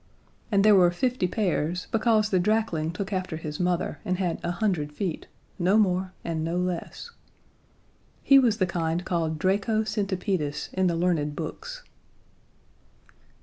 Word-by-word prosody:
And 200 0 +3
there 215 - +7
were 180 -3 +6
fifty 245 +2 0
pairs 180 -3 -1
because 220 -2 +2
the 185 - +3
drakling 180 -5 +1
took 195 +3 -5
after 185 -4 -2
his 150 -2 -6
mother, 180 -1 -1
and 185 0 -1
had 180 -3 -1
a - - -1
hundred 175 -5 -1
feet 170 +2 -4 0.3
no 185 +4 +3
more 185 -3 +2
and 160 -2 -2
no 165 +2 -1
less. 180 - -4 1.1
He 275 -1 +7
was 235 -5 +3
the 185 - +2
kind 170 0 -2
called 165 -3 -1
Draco 200 +6 +1
centipedis 195 -7 -2
in 190 0 +2
the 170 - +1
learned 165 -4 0
books. - - -6
180 Hz, 145 wpm, -26 LUFS, 170-210 Hz, 1.1 s, there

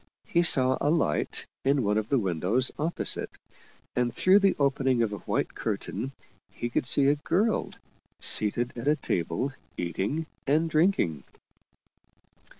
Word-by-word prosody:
He 170 - +1
saw 130 -6 +5
a 145 - +1
light 150 - -1 0.2
in 140 -1 +1
one 105 0 0
of 110 - -6
the 140 - +2
windows 100 +5 +1
opposite, 160 +3 0 0.7
and 125 -1 0
through 185 - +4
the 195 -1 +2
opening 135 -3 +1
of 105 -2 -2
a 100 - -6
white - - -3
curtain 135 - -4 0.4
he 120 - -6
could 125 - -1
see 135 +2 +5
a 140 - +4
girl 195 +9 -1 0.5
seated 120 +3 +3
at 120 +3 -6
a 150 - +4
table 90 - -3 0.2
eating 100 - -3 0.2
and 155 +4 +2
drinking. 155 - +1
130 Hz, 145 wpm, -27 LUFS, 105-150 Hz, 0.7 s, saw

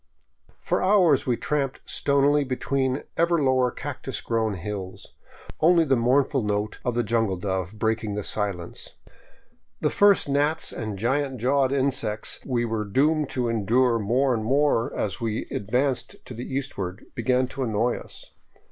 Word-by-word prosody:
For - - -1
hours 185 -9 +4
we 120 -2 +1
tramped 140 -3 -2
stonily 140 +1 +2
between 130 0 -1
ever 170 +1 +3
lower 130 -3 +3
cactus 135 -2 -5
grown 110 -3 -1
hills, 95 0 -7 0.5
only 165 +1 +5
the 135 -2 +3
mournful 130 +3 +2
note 105 0 -2
of 125 -2 -1
the 120 - +1
jungle 110 -3 0
dove 95 +2 -3
breaking 110 -1 -1
the 105 - -3
silence. 95 -5 -3 0.8
The - - 0
first 205 -5 +4
gnats 145 +3 +1
and 110 -3 -5
giant 135 +5 0
jawed 135 +2 +2
insects 135 -6 -1
we 120 -3 -1
were 110 -2 -2
doomed 145 +8 +1
to 125 -2 -1
endure 115 +2 +2
more 125 +6 +2
and 110 -2 -1
more 135 -1 +2
as 100 +1 -2
we 110 -2 -2
advanced 125 +5 -1
to - - -8
the 120 +3 -7
east 135 -3 -3
ward 95 +3 -5
began 125 +2 +1
to 140 - -6
annoy 115 0 0
us. - - -12
125 Hz, 155 wpm, -25 LUFS, 110-140 Hz, 0.8 s, only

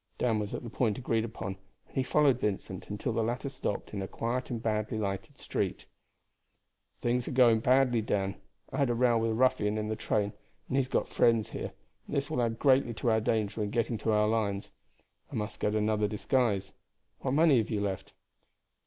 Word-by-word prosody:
Dan 115 -3 +1
was 105 -1 -3
at - - -6
the 120 - -6
point 110 -5 +1
agreed 115 -3 0
upon, 100 -4 -5 0.3
and - - -23
he 135 - +2
followed 135 -1 +3
Vincent 95 -3 -3
until 105 +2 -2
the 115 - +1
latter 120 +5 -1
stopped 130 -7 -4
in 100 - -3
a 95 - -3
quiet 120 +5 -2
and 120 -3 -2
badly 110 0 -1
lighted 100 -2 -3
street. - - -2 1.2
"Things 120 0 +1
are - - -3
going 120 -3 +5
badly, 125 0 +3
Dan. 100 -2 0 0.4
I - - -2
had 140 -3 +3
a 120 - +1
row 120 -1 +3
with 115 0 +1
a - - +1
ruffian 110 -4 +2
in 105 0 -2
the 110 - -1
train, 105 -1 0 0.3
and - - -2
he - - +3
has 135 -2 +2
got - - 0
friends 115 -1 +2
here, - - -5 0.3
and - - -4
this 140 0 -1
will 125 - +1
add 115 -1 0
greatly 130 -3 +3
to 115 - +1
our 110 0 +3
danger 110 -1 0
in 105 - -1
getting 115 0 0
to 110 - 0
our 105 0 +3
lines. 105 -3 -1 0.6
I - - -6
must 105 -1 -3
get 105 +1 0
another 105 0 +2
disguise. 105 -2 0 0.5
What 130 - -1
money 155 -4 +6
have 110 - -1
you 105 -3 -1
left?" 95 -2 -3
115 Hz, 210 wpm, -30 LUFS, 105-125 Hz, 1.2 s, money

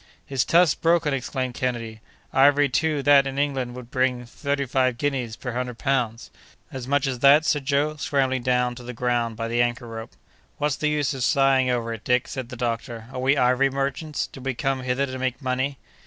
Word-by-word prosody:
"His 135 -3 0
tusk's 170 -3 +4
broken!" 165 -3 +2
exclaimed 130 -1 -3
Kennedy—"ivory 125 +4 0
too 150 +1 0
that 140 -1 +6
in 135 0 -5
England 135 -4 -1
would 125 -1 -10
bring 125 -1 0
thirty 140 +3 -2
five 130 -1 +1
guineas 130 -5 -2
per 125 - -5
hundred 125 -1 -3
pounds." 125 -4 -1 0.4
"As 130 -2 -6
much 145 0 +2
as 130 -3 -2
that?" 140 +4 +6
said 145 -4 0
Joe, 150 +2 +1
scrambling 135 -3 0
down 125 0 +1
to 125 - -10
the 125 +1 -7
ground 120 -1 -1
by 115 0 -3
the 120 +1 +1
anchor 120 +1 -1
rope. 115 0 -8 0.4
"What's 150 -2 0
the 150 - 0
use 150 -1 0
of 130 -2 -3
sighing 135 -2 +3
over 115 -2 -1
it, 110 -1 -9
Dick?" 125 0 +1
said 130 -4 -6
the 130 - -7
doctor. 115 -1 -4
"Are 130 - -4
we 135 +3 +2
ivory 125 +1 +3
merchants? 140 +3 -2
Did 135 - -12
we 135 -1 -2
come 135 +1 -1
hither 130 +2 0
to 130 -1 -6
make 130 -1 -2
money?" 130 +1 -2
130 Hz, 200 wpm, -24 LUFS, 125-140 Hz, 0.4 s, that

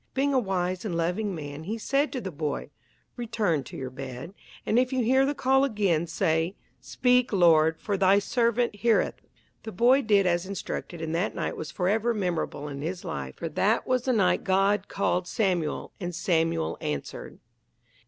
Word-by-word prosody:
Being 280 +1 +1
a 265 - +4
wise 185 -4 -2
and 185 -6 -2
loving 180 +4 -1
man 145 0 -7
he 215 +5 -3
said 275 +6 0
to 260 - -3
the 190 -6 -5
boy, 150 -1 -4 0.5
"Return 220 - 0
to - - -9
your 130 -1 -5
bed, 130 +5 -7 0.3
and 230 - +3
if 255 +1 +1
you 260 -2 +1
hear 265 +3 +3
the 290 - -1
call 265 +1 +3
again, 200 - +1
say, 165 +1 0 0.2
'Speak, 250 - +2
Lord, 160 -4 +4
for 205 -2 -2
thy 195 +1 +5
servant 235 +1 +1
heareth.'" 230 +1 +1 0.4
The 220 - -7
boy 245 +7 +4
did 205 -5 +3
as 175 0 +1
instructed 180 -3 -5
and 160 0 -3
that 175 +5 -1
night - - -2
was 155 - -6
forever 220 +5 0
memorable 175 -6 -2
in 140 -1 -6
his 175 +4 -4
life, 65 -2 -5
for 165 - -5
that 205 +9 +1
was 255 -1 0
the 255 - +2
night 195 -5 +2
God 195 +1 +2
called 180 -2 -1
Samuel 175 -7 -1
and 175 -3 -4
Samuel 165 -1 0
answered. 75 -2 -5
190 Hz, 180 wpm, -27 LUFS, 165-230 Hz, 0.5 s, thy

